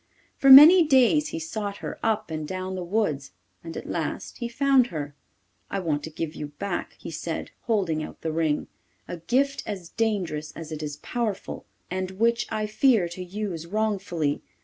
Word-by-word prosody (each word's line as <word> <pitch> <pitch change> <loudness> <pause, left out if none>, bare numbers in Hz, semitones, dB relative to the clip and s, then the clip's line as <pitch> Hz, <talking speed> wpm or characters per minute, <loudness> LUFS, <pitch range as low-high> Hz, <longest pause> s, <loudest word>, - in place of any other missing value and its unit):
For 275 - +3
many 310 +7 +11
days 295 +1 +4
he - - -5
sought 200 +5 -4
her - - -7
up 220 -6 0
and 155 -1 -4
down 185 +1 -4
the 185 -1 -4
woods 170 -8 -1 0.3
and 165 -1 -7
at - - -6
last - - -4
he 235 -1 -3
found 265 0 +3
her. 145 -7 -5 0.6
'I 200 - -2
want 150 -4 -1
to - - -6
give 160 0 -4
you 150 - -6
back,' 200 - -4
he - - -8
said, - - -5 0.2
holding 185 -9 +1
out - - -8
the 160 - -2
ring, 155 -2 0 0.4
'a 175 - -5
gift 265 +11 0
as 185 -5 -5
dangerous 180 -9 -2
as 165 -1 -9
it 155 -1 -5
is 145 -1 -5
powerful, 230 -5 -3 0.3
and 185 0 -2
which 235 +2 +2
I 215 -1 -1
fear 215 -3 +3
to 180 +2 -7
use 180 -3 -5
wrongfully. 195 -7 -1
190 Hz, 180 wpm, -25 LUFS, 160-225 Hz, 0.6 s, many